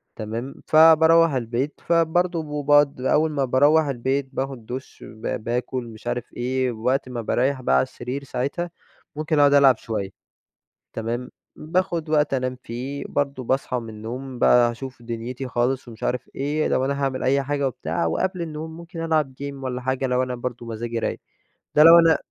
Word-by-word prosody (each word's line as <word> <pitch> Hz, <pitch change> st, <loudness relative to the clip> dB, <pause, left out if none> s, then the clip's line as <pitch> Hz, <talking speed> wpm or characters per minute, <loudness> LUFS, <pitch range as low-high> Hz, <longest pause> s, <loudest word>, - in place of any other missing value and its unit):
تمام. 115 Hz, +5 st, -5 dB
فباروَّح 160 Hz, 0 st, +6 dB
البيت، 125 Hz, +3 st, -2 dB
فبرضه 165 Hz, -2 st, +1 dB
باقعد 145 Hz, -2 st, +4 dB
أول 155 Hz, +4 st, +2 dB
ما 140 Hz, -2 st, 0 dB
باروَّح 145 Hz, +5 st, +4 dB
البيت 135 Hz, 0 st, -1 dB
باخد 135 Hz, -4 st, -4 dB
دش 130 Hz, +4 st, -8 dB
ب 110 Hz, +1 st, -5 dB
باكل 125 Hz, +2 st, -2 dB
مش 115 Hz, 0 st, -11 dB
عارف 120 Hz, 0 st, -3 dB
إيه، 130 Hz, +1 st, -1 dB
ووقت 125 Hz, +4 st, -1 dB
ما 120 Hz, -2 st, -4 dB
باريح 130 Hz, +4 st, 0 dB
بقى 65 Hz, -, +2 dB
على 65 Hz, -, +4 dB
السرير 125 Hz, +3 st, -6 dB
ساعتها، 140 Hz, +7 st, -3 dB, 0.5 s
ممكن 155 Hz, 0 st, 0 dB
أقعد 145 Hz, -1 st, +6 dB
ألعب 135 Hz, -3 st, +6 dB
شوية. 110 Hz, -4 st, -4 dB, 0.8 s
تمام. 120 Hz, +3 st, -3 dB, 0.3 s
باخد 170 Hz, 0 st, -1 dB
وقت 150 Hz, -2 st, +2 dB
أنام 130 Hz, -1 st, -1 dB
فيه، 130 Hz, +5 st, -5 dB
برضه 140 Hz, -2 st, -2 dB
باصحى 130 Hz, 0 st, -1 dB
من 115 Hz, -1 st, -9 dB
النوم 120 Hz, +4 st, -7 dB
بقى 120 Hz, -1 st, +5 dB
أشوف 130 Hz, +1 st, -9 dB
دنيتي 120 Hz, +3 st, -5 dB
خالص 125 Hz, +1 st, -1 dB
ومش 115 Hz, -1 st, -11 dB
عارف 125 Hz, 0 st, -2 dB
إيه، 145 Hz, +3 st, 0 dB
لو 130 Hz, -, +1 dB
أنا 140 Hz, +1 st, -2 dB
هاعمل 135 Hz, -1 st, -1 dB
أي 140 Hz, +2 st, +2 dB
حاجة 140 Hz, 0 st, 0 dB
وبتاع 85 Hz, -10 st, -2 dB
وقبل 185 Hz, -, -1 dB
النوم 160 Hz, 0 st, -6 dB
ممكن 170 Hz, 0 st, -8 dB
ألعب 155 Hz, -4 st, +1 dB
game 140 Hz, 0 st, -4 dB
والّا 125 Hz, -1 st, -3 dB
حاجة 130 Hz, +1 st, -1 dB
لو 125 Hz, 0 st, +1 dB
أنا 125 Hz, -1 st, -3 dB
برضه 120 Hz, -1 st, -5 dB
مزاجي 115 Hz, 0 st, -4 dB
رايق. -, -, -2 dB, 0.6 s
ده 150 Hz, -, +7 dB
لو 165 Hz, +1 st, +10 dB
أنا 165 Hz, -1 st, +5 dB
130 Hz, 170 wpm, -23 LUFS, 120-150 Hz, 0.8 s, لو